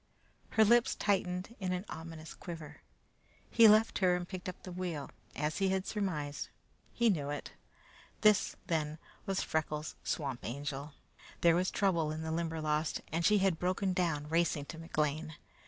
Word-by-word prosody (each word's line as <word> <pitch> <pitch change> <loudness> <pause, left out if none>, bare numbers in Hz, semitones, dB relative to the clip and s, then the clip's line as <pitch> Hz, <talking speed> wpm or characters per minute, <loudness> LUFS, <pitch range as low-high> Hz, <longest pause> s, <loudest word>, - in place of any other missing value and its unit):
Her 220 - +8
lips 235 +2 +4
tightened 190 +1 0
in 185 -2 -1
an 180 +2 -3
ominous 160 -1 -8
quiver. 165 -4 -8 0.7
He 230 -1 +8
left 215 +1 +5
her 180 -2 +4
and 175 0 -3
picked 185 -1 -5
up 180 - -9
the 185 - -7
wheel: 175 -5 -4 0.2
as 150 +4 -1
he 195 -1 +3
had 190 0 0
surmised, 155 -9 -2 0.4
he 235 -2 +3
knew 145 -6 -2
it. 145 - -4 0.7
This, 215 -2 +4
then, 155 -4 -1 0.3
was 195 -1 0
Freckles' 155 -1 -2
Swamp 135 -5 -2
Angel. 140 +3 -4 0.5
There 170 -1 +6
was 180 +1 +2
trouble 170 -6 +1
in 155 +1 -4
the 160 - -3
Limberlost, 160 -2 -1
and 165 +2 0
she 210 +4 +5
had 190 -4 +2
broken 185 +1 0
down 165 -5 0
racing 165 -2 +1
to 160 - -9
McLean. 155 -1 -1
170 Hz, 160 wpm, -33 LUFS, 155-190 Hz, 0.7 s, Her